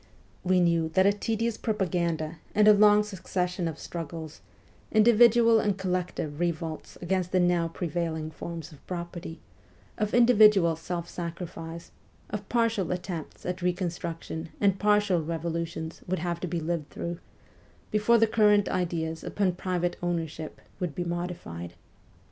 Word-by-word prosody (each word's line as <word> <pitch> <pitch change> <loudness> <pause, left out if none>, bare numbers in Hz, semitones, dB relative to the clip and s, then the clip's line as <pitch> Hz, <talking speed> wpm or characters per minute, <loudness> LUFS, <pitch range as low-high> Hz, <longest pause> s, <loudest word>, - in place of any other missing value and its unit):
We 185 0 +3
knew 170 -2 +2
that 190 0 +5
a 200 - +5
tedious 225 +2 -1
propaganda 170 -6 -1 0.2
and 210 0 +5
a 215 - +10
long 210 0 +6
succession 180 -3 -2
of 160 -2 -4
struggles, 160 -2 -7 0.5
individual 230 +1 +6
and 205 -3 0
collective 180 -5 -2
revolts 165 -2 -3
against 180 0 0
the 185 - +3
now 175 -1 +2
prevailing 165 -2 -3
forms 165 +1 -7
of 150 - -16
property, 170 -2 -6 0.6
of 210 0 0
individual 210 -8 +6
self 170 +1 -5
sacrifice, 170 -1 -7 0.4
of 205 -1 -5
partial 230 -6 +1
attempts 180 -3 -5
at 180 +1 -3
reconstruction 170 -2 -3
and 195 -2 +2
partial 205 -4 +3
revolutions 165 0 -4
would 185 +1 0
have 170 +1 -2
to 180 - -3
be 170 0 -2
lived 165 -2 -3
through, 170 0 -5 0.7
before 215 +2 +4
the 225 - +5
current 210 -2 +4
ideas 165 -3 -2
upon 195 -3 0
private 175 -1 -2
ownership 165 -3 -3 0.2
would 175 -6 -3
be 175 - -1
modified. 170 - -5
175 Hz, 135 wpm, -28 LUFS, 165-200 Hz, 0.7 s, a